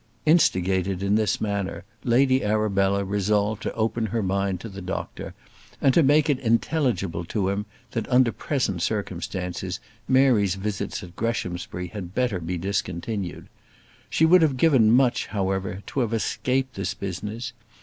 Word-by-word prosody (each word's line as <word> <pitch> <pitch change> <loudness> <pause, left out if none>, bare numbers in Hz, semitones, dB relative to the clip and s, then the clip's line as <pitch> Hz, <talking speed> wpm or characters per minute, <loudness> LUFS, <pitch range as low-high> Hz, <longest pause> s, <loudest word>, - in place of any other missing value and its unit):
Instigated 95 - +2
in 100 +1 +1
this 110 -1 +2
manner, 100 -4 -2 0.2
Lady 130 +2 +3
Arabella 100 -2 +1
resolved 105 +2 0
to - - -3
open 110 0 0
her 110 +1 -1
mind 95 -1 0
to 115 - -7
the 100 -2 -8
doctor, 95 +1 -5 0.4
and 135 - +4
to 170 - +5
make 150 +2 +4
it 140 -4 +1
intelligible 115 - 0
to 95 +2 -1
him 100 +2 -2 0.2
that, 115 -3 -3
under 125 -2 +4
present 115 - -2
circumstances, 95 -2 -3 0.3
Mary's 125 -8 +4
visits 100 +1 -3
at 90 -1 -11
Greshamsbury 90 -5 -3
had 95 -2 -7
better 120 -7 +1
be 85 +2 -3
discontinued. 95 +1 -3 0.6
She 160 - +3
would 180 +2 +6
have 145 -5 +2
given 130 -7 +5
much, 125 0 +3
however, 95 -1 -2
to - - -3
have 115 -3 0
escaped 130 +3 -1
this 100 - -3
business. 105 +5 -5
105 Hz, 150 wpm, -25 LUFS, 95-120 Hz, 0.6 s, would